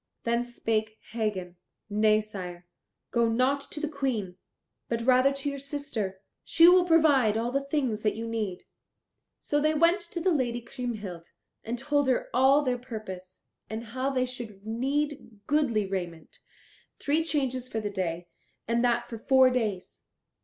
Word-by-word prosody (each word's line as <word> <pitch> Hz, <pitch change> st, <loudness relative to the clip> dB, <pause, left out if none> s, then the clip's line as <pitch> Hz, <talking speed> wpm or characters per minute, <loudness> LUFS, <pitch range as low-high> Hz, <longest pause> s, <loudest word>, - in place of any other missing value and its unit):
Then 235 Hz, +1 st, +1 dB
spake 220 Hz, -2 st, -2 dB
Hagen, 200 Hz, -6 st, -3 dB, 0.3 s
"Nay, 215 Hz, +1 st, +3 dB
sire, 180 Hz, -4 st, -8 dB, 0.5 s
go 235 Hz, -1 st, +2 dB
not 255 Hz, +5 st, +2 dB
to 300 Hz, -, -5 dB
the 305 Hz, -, -1 dB
Queen, 260 Hz, -11 st, -2 dB, 0.5 s
but 230 Hz, 0 st, -1 dB
rather 255 Hz, +2 st, +5 dB
to 275 Hz, +1 st, -4 dB
your 280 Hz, -1 st, -2 dB
sister. 270 Hz, -9 st, -4 dB, 0.2 s
She 335 Hz, +1 st, +6 dB
will 360 Hz, 0 st, +7 dB
provide 290 Hz, -10 st, +4 dB
all 235 Hz, +2 st, -1 dB
things 275 Hz, -7 st, -1 dB
that 210 Hz, -, +1 dB
you 225 Hz, +1 st, -4 dB
need." 215 Hz, -5 st, -3 dB, 0.7 s
So 290 Hz, 0 st, -1 dB
they 310 Hz, +1 st, +2 dB
went 335 Hz, +5 st, +4 dB
to 360 Hz, -, -6 dB
the 365 Hz, +2 st, +2 dB
Lady 245 Hz, -6 st, 0 dB
Kriemhild 220 Hz, -8 st, -6 dB, 0.4 s
and 235 Hz, +2 st, -3 dB
told 285 Hz, +2 st, +1 dB
her 255 Hz, -, 0 dB
all 265 Hz, +4 st, +5 dB
their 250 Hz, -2 st, 0 dB
purpose, 190 Hz, -7 st, -8 dB, 0.3 s
and 220 Hz, +1 st, -4 dB
how 260 Hz, +1 st, 0 dB
they 255 Hz, -2 st, +1 dB
should 230 Hz, -6 st, -8 dB
need 265 Hz, -1 st, -2 dB
goodly 270 Hz, -8 st, +2 dB
raiment, 175 Hz, -4 st, -5 dB, 0.6 s
three 300 Hz, +3 st, +1 dB
changes 265 Hz, -5 st, -1 dB
for 225 Hz, -, -3 dB
the 205 Hz, -1 st, -3 dB
day, 175 Hz, -3 st, -3 dB, 0.4 s
and 235 Hz, +1 st, +1 dB
that 240 Hz, -1 st, +1 dB
for 230 Hz, -, -7 dB
four 260 Hz, +1 st, +5 dB
days. 215 Hz, -7 st, -2 dB
240 Hz, 155 wpm, -28 LUFS, 215-275 Hz, 0.7 s, will